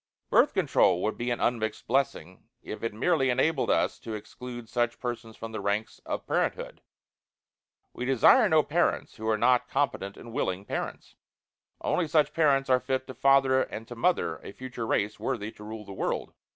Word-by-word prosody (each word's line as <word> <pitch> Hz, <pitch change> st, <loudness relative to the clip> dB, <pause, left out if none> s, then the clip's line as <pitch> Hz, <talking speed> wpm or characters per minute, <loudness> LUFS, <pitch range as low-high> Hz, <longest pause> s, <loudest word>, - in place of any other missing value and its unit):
Birth -, -, +4 dB
Control 90 Hz, 0 st, +3 dB
would 110 Hz, -, 0 dB
be 120 Hz, +1 st, -3 dB
an 120 Hz, -, -1 dB
unmixed 110 Hz, -3 st, -1 dB
blessing 125 Hz, -, -1 dB, 0.2 s
if -, -, -7 dB
it 115 Hz, -, -2 dB
merely 135 Hz, +5 st, +1 dB
enabled 130 Hz, +6 st, +1 dB
us -, -, +1 dB
to 110 Hz, -, -6 dB
exclude 120 Hz, +2 st, -8 dB
such 120 Hz, 0 st, -1 dB
persons 120 Hz, -2 st, -5 dB
from 115 Hz, 0 st, -7 dB
the 110 Hz, -, -4 dB
ranks 105 Hz, +2 st, -2 dB
of -, -, -3 dB
parenthood. -, -, -2 dB, 1.1 s
We 125 Hz, -, -4 dB
desire 135 Hz, -, +5 dB
no 155 Hz, -3 st, +5 dB
parents 170 Hz, +5 st, 0 dB
who 110 Hz, 0 st, -5 dB
are 110 Hz, -, +2 dB
not 125 Hz, +3 st, +3 dB
competent 105 Hz, -8 st, -1 dB
and 115 Hz, -, -11 dB
willing 95 Hz, -2 st, -2 dB
parents. -, -, -5 dB, 0.6 s
Only 175 Hz, -, 0 dB
such 150 Hz, -1 st, +2 dB
parents 140 Hz, -4 st, +3 dB
are 130 Hz, -1 st, +4 dB
fit 130 Hz, +1 st, -2 dB
to 130 Hz, -, -8 dB
father 135 Hz, -1 st, +4 dB
and 110 Hz, -2 st, -5 dB
to 120 Hz, -, -7 dB
mother 165 Hz, -, +1 dB
a -, -, -9 dB
future 125 Hz, -2 st, -6 dB
race 105 Hz, -1 st, 0 dB
worthy 110 Hz, -5 st, -3 dB
to 105 Hz, -, -13 dB
rule 110 Hz, 0 st, -7 dB
the 100 Hz, -, -9 dB
world. -, -, -3 dB
120 Hz, 180 wpm, -28 LUFS, 110-135 Hz, 1.1 s, desire